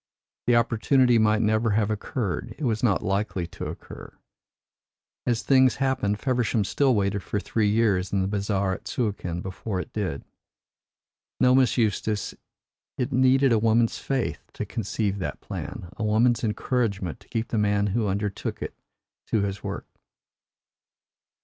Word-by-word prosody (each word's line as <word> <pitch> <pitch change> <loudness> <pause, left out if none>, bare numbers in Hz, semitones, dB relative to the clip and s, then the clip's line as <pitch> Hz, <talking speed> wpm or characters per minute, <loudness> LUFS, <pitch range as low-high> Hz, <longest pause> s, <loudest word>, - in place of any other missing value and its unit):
The 120 - +5
opportunity 120 +1 +3
might 110 0 +3
never 110 +2 +2
have 110 -1 +1
occurred 110 - -3
it 155 - -7
was 110 -4 0
not 105 -6 +2
likely 95 -2 -1
to - - -7
occur. - - -9 1.2
As 120 -2 +1
things 130 -2 +5
happened, 130 -7 0
Feversham 120 -4 +1
still 130 +6 +2
waited 100 0 0
for 105 - -2
three 105 0 0
years 100 -4 +2
in 100 - +1
the - - -1
bazaar 100 -1 0
at - - -8
Suakin 95 -7 -2
before 95 +1 -4
it - - -7
did. 95 -10 -3 1.2
No, 125 - +5
Miss 130 -1 +4
Eustace, 105 -2 0 0.6
it 125 +2 -1
needed 130 +1 +4
a 115 - +4
woman's 115 +1 +2
faith 135 -3 -1
to - - -4
conceive 100 -2 -2
that 90 - -4
plan 85 - -6
a 110 - -4
woman's 115 +3 +3
encouragement 105 -5 -1
to - - -21
keep 115 0 -2
the 110 - 0
man 105 -1 +2
who 115 -2 +1
undertook 100 0 -2
it - - -5 0.5
to 110 - +1
his 100 0 -3
work." - - -4
110 Hz, 150 wpm, -26 LUFS, 100-120 Hz, 1.2 s, The